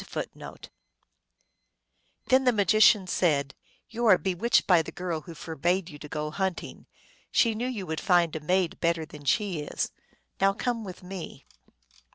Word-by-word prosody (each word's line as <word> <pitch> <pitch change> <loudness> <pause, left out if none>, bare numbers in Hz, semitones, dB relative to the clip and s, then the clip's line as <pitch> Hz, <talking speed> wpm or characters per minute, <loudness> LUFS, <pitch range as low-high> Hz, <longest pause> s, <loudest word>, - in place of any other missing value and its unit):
1 - - -2 2.0
Then 260 +1 +4
the 250 - +5
magician 210 -1 +4
said, 145 -7 +1 0.2
" - - -37
You 235 +1 -1
are 190 -4 +7
bewitched 190 +5 +1
by 175 -3 +5
the - - -8
girl 175 -3 -4
who 170 +1 -11
forbade 170 +4 -2
you 145 - -11
to 150 - -9
go 150 +1 -3
hunting; 190 +2 -4 0.4
she 230 -2 +3
knew 235 +3 -3
you 225 -7 -4
would 160 -2 -4
find 175 -4 +3
a - - -2
maid 180 +3 0
better 170 -1 0
than 150 -1 -13
she 190 +1 +1
is. 150 - -3 0.5
Now 195 +1 +4
come 230 +2 -2
with 185 -2 -9
me." 185 -1 -8
180 Hz, 165 wpm, -27 LUFS, 160-205 Hz, 2.0 s, are